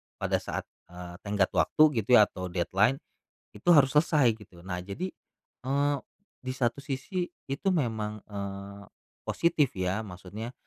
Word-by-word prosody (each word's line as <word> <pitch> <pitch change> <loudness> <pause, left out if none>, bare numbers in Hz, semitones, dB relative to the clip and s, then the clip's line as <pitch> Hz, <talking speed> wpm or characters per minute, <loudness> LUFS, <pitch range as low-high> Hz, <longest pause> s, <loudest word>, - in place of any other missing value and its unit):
pada - - 0
saat, - - -4 0.2
eee, 90 0 -10
tenggat 100 -2 +1
waktu 85 - +4 0.2
gitu 115 +4 +4
ya 105 - +9
atau 90 -2 -4
deadline, 95 +8 +1 0.5
itu 105 +12 -2
harus 140 -3 +6
selesai 150 -6 +4
gitu. 100 -5 -16
Nah 90 -1 -3
jadi, 100 - -4 0.6
eee, 140 +2 +2 0.5
di 130 0 -4
satu 125 +1 0
sisi 140 +7 -3 0.2
itu 145 +8 -3
memang, 110 - -1
eee, 100 0 -6 0.4
positif 155 -5 +2
ya, 95 +3 0
maksudnya 100 +4 -8
110 Hz, 140 wpm, -29 LUFS, 95-140 Hz, 0.6 s, ya